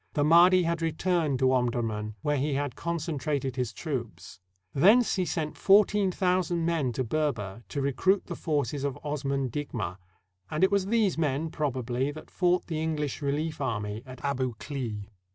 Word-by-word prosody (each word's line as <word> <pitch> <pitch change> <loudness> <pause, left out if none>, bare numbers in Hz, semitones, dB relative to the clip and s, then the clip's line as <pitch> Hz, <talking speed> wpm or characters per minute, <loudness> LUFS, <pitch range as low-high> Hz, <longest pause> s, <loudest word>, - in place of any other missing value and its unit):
The 145 - +1
Mahdi 175 +4 +6
had 170 0 -1
returned 165 -2 0
to 130 0 +3
Omdurman, 115 -4 -1
where 150 0 +1
he 140 +1 0
had 140 -3 -2
concentrated 150 -5 -2
his 125 -3 -1
troops. 115 - -6 0.3
Thence 210 - +5
he 185 -3 0
sent 155 -3 -3
fourteen 200 -1 +4
thousand 180 -2 +1
men 160 -7 +1
to 130 - -1
Ber 150 +5 +1
ber 105 -2 -7
to 140 - -2
recruit 185 +9 +2
the - - -5
forces 145 -3 -1
of 140 -1 -2
Osman 140 -3 -2
Digma, 110 -10 -4 0.5
and 155 - -1
it 190 - +5
was 200 -1 +1
these 210 -6 +2
men, 155 +1 0
probably, 130 -3 -1
that 155 +2 -9
fought 180 -1 +2
the 160 - -3
EngUsh 150 -3 -2
relief 150 +2 -2
army 105 -4 -2
at 130 +2 -9
Abu 130 -4 -1
Klea. 115 -8 -5
145 Hz, 170 wpm, -28 LUFS, 130-170 Hz, 0.5 s, Mahdi